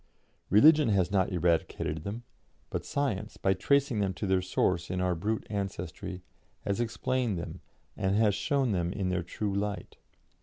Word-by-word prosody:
Religion 150 - +6
has 95 -3 +2
not 95 -1 +2
eradicated 85 -3 0
them, 105 +5 -5 0.5
but - - -2
science, 110 -7 -2
by 95 - +2
tracing 135 +4 +2
them 95 -2 0
to 105 - -3
their 95 -1 +2
source 90 -1 0
in 90 0 -2
our 90 0 +1
brute 105 +6 -2
ancestry, 95 -2 -5 0.4
has 100 +1 -2
explained 120 -2 -1
them 85 - -6 0.3
and 95 -1 0
has 105 -1 +4
shown 135 +2 +1
them 85 -3 0
in 95 -1 -2
their 90 -1 0
true 100 +4 -3
light. 100 +1 -3
100 Hz, 160 wpm, -29 LUFS, 90-110 Hz, 0.5 s, Religion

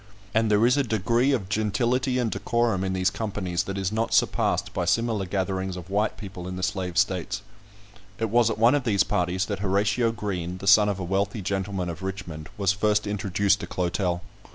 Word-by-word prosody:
And 110 0 +2
there 105 +2 +4
is 125 +3 +4
a 140 - +3
degree 115 +3 +1
of 115 -9 -1
gentility 120 +5 0
and 120 -3 0
decorum 120 -5 0
in 95 0 -1
these 95 0 +1
companies 95 -6 -2
that 95 0 -4
is 95 0 -1
not 110 +1 0
surpassed - - +1
by - - -1
similar 115 -4 +1
gatherings 95 -1 -2
of 90 +1 -9
white 105 +2 0
people 95 -4 -8
in 90 - -5
the 90 - -5
Slave 90 -2 -2
States. 90 -4 0 0.7
It 115 -2 -2
was 120 -1 +4
at 110 - -2
one 115 +4 +5
of 145 -2 +1
these 100 -5 +3
parties 90 +1 0
that 100 -2 -4
Horatio 105 +4 +1
Green, 90 -5 -4
the 100 - -8
son 105 +1 +6
of 100 - -1
a - - -3
wealthy 100 +3 -1
gentleman 95 -1 -2
of 85 +1 -6
Richmond, 90 -5 -6
was 100 -2 +2
first 105 +1 +1
introduced 100 0 +1
to - - -6
Clotel. 90 0 -1
100 Hz, 200 wpm, -25 LUFS, 95-110 Hz, 0.7 s, son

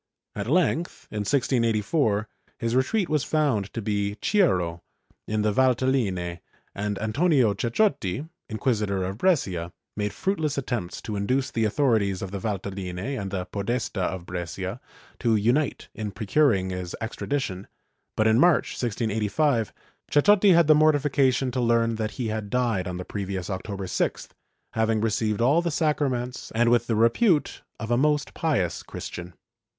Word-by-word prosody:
At 100 +1 -3
length, 170 +1 0
in 105 - -3
1684, 115 -1 +1 0.3
his 115 0 -1
retreat 185 - +1
was 150 -4 +1
found 135 -11 0
to 115 - -3
be 100 -1 -1
Chiuro, 90 - +1 0.5
in 110 0 0
the 105 -1 +1
Valtelline, 115 -9 +1 0.3
and 105 0 -3
Antonio 125 - +2
Ceccotti, 130 - 0 0.2
Inquisitor 105 -4 0
of 95 +3 -4
Brescia, 95 - +1 0.2
made 105 -1 -1
fruitless 160 -7 -1
attempts 120 -9 -3
to 105 - -4
induce 130 +7 0
the 115 -1 0
authori 115 +1 +3
ties 100 -2 -2
of 95 - -5
the 100 - -4
Valtelline 95 -3 -4 0.2
and 100 - -4
the 95 -2 -3
Podesta 100 +2 -2
of 90 -1 -2
Brescia 90 -2 -5 0.4
to 115 -2 +2
unite 120 +7 +1
in 105 -2 -4
procur 110 +10 +2
ing 95 0 -3
his 90 -1 -5
extradition, 110 -4 -3 0.5
but 110 - +3
in 110 +1 +4
March, 175 0 +4
1685, 115 +2 0 0.4
Ceccotti 200 +5 +5
had 170 0 +5
the 155 - +7
mortifi 150 -2 +3
cation 130 -2 +2
to 125 0 -1
learn 115 -1 +2
that 110 -1 -1
he 120 -3 -2
had 110 -1 -3
died 115 -7 0
on 90 -1 -4
the 90 - -6
previous 95 -2 -4
October 95 +1 -4
6th, 90 - -2 0.4
having 110 -1 +1
received 110 0 0
all 140 +8 +4
the 170 - -1
sacraments 140 -6 -1
and 120 +1 +3
with 120 -1 +3
the 115 - +1
repute 145 - +2 0.2
of 110 +2 -4
a 120 - +3
most 150 +2 +1
pious 130 - 0
Christian. 90 0 -8
115 Hz, 155 wpm, -25 LUFS, 100-140 Hz, 0.5 s, the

